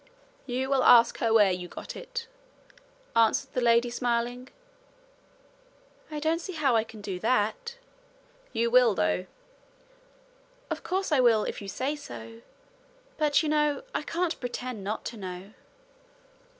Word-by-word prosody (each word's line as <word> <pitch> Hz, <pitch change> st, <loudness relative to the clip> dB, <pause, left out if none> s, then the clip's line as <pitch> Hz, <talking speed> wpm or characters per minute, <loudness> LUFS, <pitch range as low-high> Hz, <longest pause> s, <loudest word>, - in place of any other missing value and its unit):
'You 255 Hz, +1 st, -1 dB
will 270 Hz, -2 st, +3 dB
ask 235 Hz, -1 st, +6 dB
her 230 Hz, -, +1 dB
where 210 Hz, -4 st, +5 dB
you 180 Hz, -1 st, -4 dB
got -, -, -8 dB
it,' -, -, -6 dB, 0.9 s
answered 230 Hz, +4 st, +2 dB
the 250 Hz, -, 0 dB
lady 235 Hz, 0 st, +3 dB
smiling. 245 Hz, +1 st, -2 dB, 1.6 s
'I 305 Hz, -1 st, -4 dB
don't 325 Hz, +2 st, +1 dB
see 370 Hz, +2 st, -6 dB
how 285 Hz, -6 st, +2 dB
I 220 Hz, -, +3 dB
can 220 Hz, -1 st, -12 dB
do 195 Hz, -3 st, -5 dB
that.' 255 Hz, -, 0 dB, 0.7 s
'You 235 Hz, 0 st, 0 dB
will, 245 Hz, -4 st, +5 dB
though.' 180 Hz, +2 st, 0 dB, 1.4 s
'Of -, -, -3 dB
course 380 Hz, -1 st, -2 dB
I 295 Hz, -, +4 dB
will, 230 Hz, -4 st, +4 dB
if -, -, -5 dB
you 200 Hz, -, -8 dB
say 265 Hz, +9 st, -2 dB
so. 115 Hz, -, -10 dB, 0.8 s
But, 300 Hz, 0 st, +3 dB
you 310 Hz, -, -1 dB
know, 300 Hz, +2 st, +1 dB
I -, -, -1 dB
can't 345 Hz, 0 st, -2 dB
pretend 245 Hz, -3 st, -5 dB
not 210 Hz, +3 st, -4 dB
to 230 Hz, -, -5 dB
know.' 185 Hz, +1 st, -8 dB
245 Hz, 145 wpm, -28 LUFS, 215-295 Hz, 1.6 s, ask